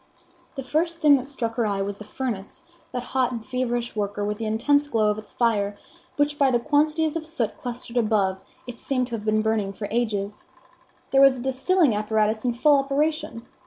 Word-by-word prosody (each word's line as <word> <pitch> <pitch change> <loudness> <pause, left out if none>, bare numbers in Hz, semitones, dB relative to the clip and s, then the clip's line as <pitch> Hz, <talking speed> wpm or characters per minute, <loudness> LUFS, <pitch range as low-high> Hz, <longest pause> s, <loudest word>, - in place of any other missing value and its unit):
The 270 - -4
first 325 +6 0
thing 300 -3 +6
that 265 +1 -6
struck 235 -5 -3
her 235 - +2
eye 200 -1 -1
was 200 0 -4
the 210 - -9
furnace, 215 -3 -5 0.3
that 245 - -3
hot 255 0 0
and 230 -3 -6
feverish 245 -2 -2
worker, 205 -1 -2
with 210 +1 -3
the 225 - -2
intense 285 +7 +2
glow 220 -6 +2
of 210 - -3
its 215 - -10
fire, 205 -4 0 0.4
which 290 +1 0
by 275 -2 +5
the 240 -2 +2
quantities 305 +4 +1
of 330 - -2
soot 310 -8 -2
clustered 245 0 -6
above 205 -5 +1 0.3
it 245 -2 -9
seemed 255 -2 0
to 235 - -3
have 215 -1 -7
been 215 0 +2
burning 215 -3 0
for 205 +1 -5
ages. 210 -3 -2 0.6
There 270 - +5
was 275 -1 +6
a - - -6
distilling 270 - +2
apparatus 215 +1 0
in 245 -2 +1
full 290 +4 +4
operation. 280 -3 -1
240 Hz, 200 wpm, -24 LUFS, 215-275 Hz, 0.6 s, thing